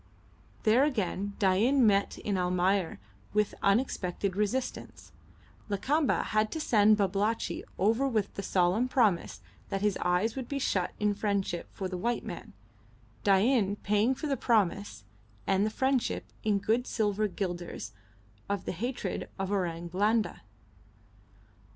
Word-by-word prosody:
There 230 +4 +5
again 205 -7 -1
Dain 225 +7 +3
met 200 -2 +2
in 205 - -2
Almayer 180 0 +1 0.4
with 210 -1 +1
unexpected 200 -3 0
resistance; 210 +6 -3 0.6
Lakamba 275 +9 +1
had 215 0 0
to 320 - -3
send 215 -6 +4
Babalatchi 205 +3 0
over 225 +8 +2
with 215 -6 -1
the - - -4
solemn 190 +6 +2
promise 200 - +1 0.3
that 195 - -2
his 210 -2 +1
eyes 180 +6 +1
would 260 -3 -5
be 280 - -3
shut 185 -9 0
in 210 0 +2
friendship 200 -4 -2
for 190 - -4
the 180 -1 -5
white 235 +4 -1
man, - - -8 0.7
Dain 200 +1 +3
paying 210 +5 +1
for 310 - -6
the 285 -2 +1
promise 205 - 0 0.4
and 195 +2 +2
the - - 0
friendship 265 +2 0 0.2
in 210 -2 +2
good 225 +5 0
silver 210 -1 0
guilders 175 - -5 0.6
of 200 -2 -2
the - - -2
hated 240 +8 -4
Orang 180 -4 -2
Blanda. 210 +5 0
205 Hz, 130 wpm, -29 LUFS, 190-230 Hz, 0.7 s, There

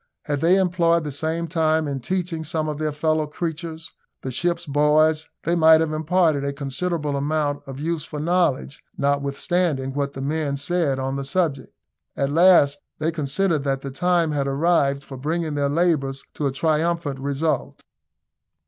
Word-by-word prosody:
Had 145 -2 -2
they 175 +3 +5
employed 170 -3 +2
the 150 - -4
same 160 +4 -2
time 160 -2 +1
in 140 -1 -3
teaching 170 +3 -2
some 155 0 -2
of 150 -1 -4
their 155 -1 -1
fellow 155 +1 0
creatures, 160 +1 -5 0.3
the 130 - -3
ship's 170 +5 -1
boys, 150 +2 +2
they 170 - 0
might 160 -1 +6
have 160 -1 0
imparted 160 -2 +2
a 140 - -1
considerable 145 +2 -2
amount 145 0 -1
of 135 0 -7
useful 155 -1 -3
knowledge, 155 -4 0
notwithstanding 140 +1 0
what 140 0 -2
the 135 - -6
men 145 -1 -1
said 145 -1 0
on 135 +1 -2
the 140 - -3
subject. 145 -1 -1 0.5
At 140 0 0
last 160 -4 +5 0.2
they 155 +2 0
considered 155 +1 0
that 135 -1 0
the 135 - -6
time 175 +2 +1
had 140 -2 -1
arrived 140 -1 +1
for 135 -1 -9
bringing 160 +3 -2
their 140 -1 0
labours 145 -4 0
to 145 - -1
a - - -1
triumphant 155 0 0
result. 140 +3 -2
155 Hz, 165 wpm, -23 LUFS, 140-165 Hz, 0.5 s, might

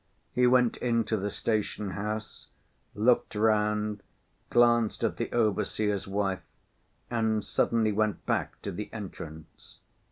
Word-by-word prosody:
He 125 0 +4
went 125 -1 +4
into 115 -2 +1
the 100 0 -1
station 105 -1 -1
house, 105 +3 -5 0.5
looked 115 +1 +2
round, 105 -1 +1 0.5
glanced 120 -2 +3
at - - 0
the - - -3
overseer's 105 -2 0
wife, 95 -2 -1 0.7
and 110 -2 +1
suddenly 115 -2 +2
went 105 -1 0
back - - -1
to - - -3
the 105 +4 -6
entrance. 80 -7 -9
105 Hz, 120 wpm, -29 LUFS, 105-115 Hz, 0.7 s, He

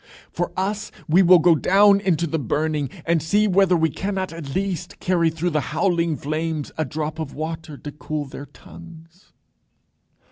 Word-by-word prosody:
For 175 +1 -2
us, 205 +3 -2 0.2
we 170 +4 +5
will 180 0 +7
go 170 +1 +5
down 200 +5 +5
into 175 -5 +1
the 160 0 -2
burning, 145 +2 -1 0.2
and 165 -1 +2
see 205 +7 +2
whether 190 -2 +3
we 160 -1 +1
cannot 190 -1 -3
at 150 -5 -7
least 185 -2 -3
carry 175 -2 +2
through 165 +2 -2
the 150 -1 +1 0.2
howling 170 -5 +1
flames 155 0 -3
a 155 - -1
drop 155 +1 -4
of 155 -3 -5
water 155 -1 -5
to 145 - -8
cool 150 0 -5
their 140 +1 -9
tongues." 165 +4 -15
165 Hz, 170 wpm, -22 LUFS, 155-185 Hz, 0.2 s, will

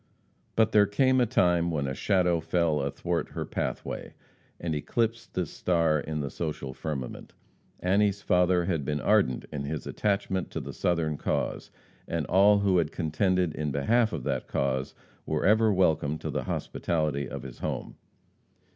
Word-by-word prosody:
But 110 -1 +3
there 105 -1 +5
came 130 +5 +3
a 120 - +3
time 90 -7 +3
when 75 -4 -1
a 65 - -2
shadow 90 +1 +2
fell 80 -2 +1
athwart 70 0 -2
her - - -3
pathway, - - -4 0.4
and 85 -2 -2
eclipsed 115 +9 -2
this 90 -5 -1
star 85 -3 +2
in 75 +1 -3
the 70 -2 -4
social 75 -5 -4
firmament. 70 -4 -5 0.5
Annie's 100 +2 +2
father 90 -1 +3
had 85 -5 -1
been 75 +2 -1
ardent 65 -2 +2
in 70 -2 -4
his 75 +1 -4
attachment 100 -2 -1
to - - -4
the - - -7
Southern 80 -4 0
cause, - - -2 0.4
and 85 -3 -2
all 100 +4 +5
who 100 -3 +3
had 80 -2 0
contended 90 +1 0
in 75 -1 -2
behalf 110 - +2
of 80 -7 -4
that - - -2
cause 65 0 -1 0.3
were 80 -1 0
ever 110 +2 +5
welcome 80 -6 +2
to - - -5
the - - -2
hospitality 75 -5 -1
of - - -6
his 65 -2 -9
home. - - -4
85 Hz, 165 wpm, -28 LUFS, 75-95 Hz, 0.5 s, there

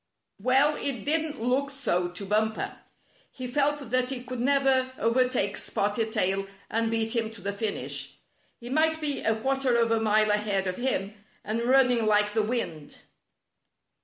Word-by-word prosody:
Well, 270 +7 +3
it 255 -7 -3
didn't 310 -1 0
look 255 +4 0
so 180 -11 -1
to 180 +3 -7
Bumper. 215 +2 0 0.5
He 255 - -7
felt 280 0 0
that 255 0 +2
he 260 -2 -4
could 255 -1 -6
never 265 0 +2
overtake 230 -3 +1
Spotted 215 +2 -1
Tail 195 0 0 0.2
and 225 0 +1
beat 225 +1 0
him 225 -2 0
to 225 -1 -12
the 200 +1 -3
finish. 205 0 -4 0.4
He 240 +1 -8
might 315 +2 +2
be 295 -2 -1
a 225 - +1
quarter 270 0 +1
of 230 -1 +2
a 225 - +3
mile 215 -1 +3
ahead 210 -2 0
of 185 -1 -2
him, 215 -6 -1 0.3
and 230 +3 -2
running 250 -4 +4
like 210 -1 +3
the 220 - +2
wind. 210 -10 -4
230 Hz, 160 wpm, -27 LUFS, 210-265 Hz, 0.5 s, running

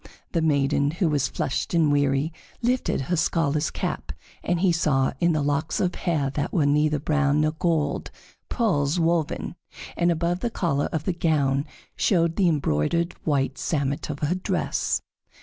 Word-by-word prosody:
The 170 - +1
maiden, 140 -2 +2
who 170 +3 0
was 145 -3 +1
flushed 135 - -2
and 160 -3 +4
weary, 145 +2 +1 0.3
lifted 245 - +1
her 155 +7 -1
scholar's 155 -2 +1
cap, - - -4 0.3
and 175 -1 0
he 190 -2 +4
saw, 140 -5 +1
in 170 0 +3
the 150 -2 0
locks 145 +2 0
of 180 -1 +1
hair 150 -6 -1
that 145 +1 -2
were 160 -6 +2
neither 150 +1 +3
brown 150 0 +1
nor 155 0 +2
gold, 160 -1 -1 0.4
pearls 175 - +1
woven; 165 -1 0 0.4
and 175 0 +2
above 170 +2 0
the 240 - -1
collar 155 -10 -1
of 160 -2 -2
the 185 - 0
gown 145 -4 +1 0.3
showed 170 -4 +2
the 185 -3 +3
embroidered 155 - 0
white 135 -3 0
samite 140 -2 -1
of 145 -1 -5
her 150 +3 +1
dress. 185 - -1
155 Hz, 165 wpm, -25 LUFS, 145-170 Hz, 0.4 s, and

